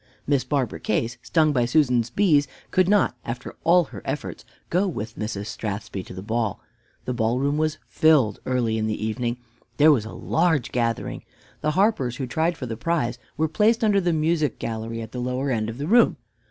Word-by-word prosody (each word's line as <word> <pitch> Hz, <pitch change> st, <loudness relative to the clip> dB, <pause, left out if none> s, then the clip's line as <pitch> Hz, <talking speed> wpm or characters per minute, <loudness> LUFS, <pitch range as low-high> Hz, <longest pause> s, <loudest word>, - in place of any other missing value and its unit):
Miss 140 Hz, -2 st, +2 dB
Barbara 135 Hz, -6 st, -1 dB
Case, 115 Hz, +3 st, -1 dB
stung 155 Hz, 0 st, +2 dB
by 125 Hz, -3 st, +2 dB
Susan's 125 Hz, -3 st, +2 dB
bees, 150 Hz, -, +3 dB, 0.2 s
could 185 Hz, 0 st, +3 dB
not, 205 Hz, -10 st, +3 dB
after 120 Hz, +1 st, -6 dB
all 175 Hz, +2 st, +5 dB
her 120 Hz, -, -10 dB
efforts, -, -, -4 dB, 0.3 s
go 185 Hz, +4 st, +2 dB
with 115 Hz, -, -5 dB
Mrs. 105 Hz, -2 st, -4 dB
Strathspey 105 Hz, -2 st, -4 dB
to -, -, -9 dB
the 95 Hz, -, -7 dB
ball. 110 Hz, -1 st, -1 dB, 0.5 s
The 125 Hz, -, -2 dB
ballroom 125 Hz, +5 st, +1 dB
was 155 Hz, 0 st, 0 dB
filled 145 Hz, -10 st, +3 dB
early 120 Hz, -3 st, +1 dB
in 110 Hz, -, 0 dB
the 110 Hz, 0 st, -2 dB
evening. 120 Hz, +2 st, -2 dB, 0.4 s
There 155 Hz, +1 st, +7 dB
was 120 Hz, -7 st, +2 dB
a 110 Hz, -, -7 dB
large 160 Hz, -6 st, +1 dB
gathering. 115 Hz, -2 st, -1 dB, 0.4 s
The 155 Hz, -, 0 dB
harpers 190 Hz, -, +2 dB
who 130 Hz, -, -3 dB
tried 160 Hz, +6 st, 0 dB
for 130 Hz, -, -5 dB
the 115 Hz, -2 st, -4 dB
prize 125 Hz, -4 st, -1 dB, 0.2 s
were 160 Hz, -, +2 dB
placed 220 Hz, -, +2 dB
under 205 Hz, -2 st, +4 dB
the 175 Hz, -1 st, +1 dB
music 155 Hz, -3 st, +1 dB
gallery 115 Hz, 0 st, -4 dB
at 110 Hz, -, -10 dB
the 125 Hz, -, -4 dB
lower 125 Hz, +2 st, -1 dB
end 110 Hz, -2 st, -1 dB
of 115 Hz, -, -6 dB
the 140 Hz, -, -3 dB
room. 235 Hz, +8 st, +4 dB
125 Hz, 195 wpm, -24 LUFS, 115-160 Hz, 0.5 s, There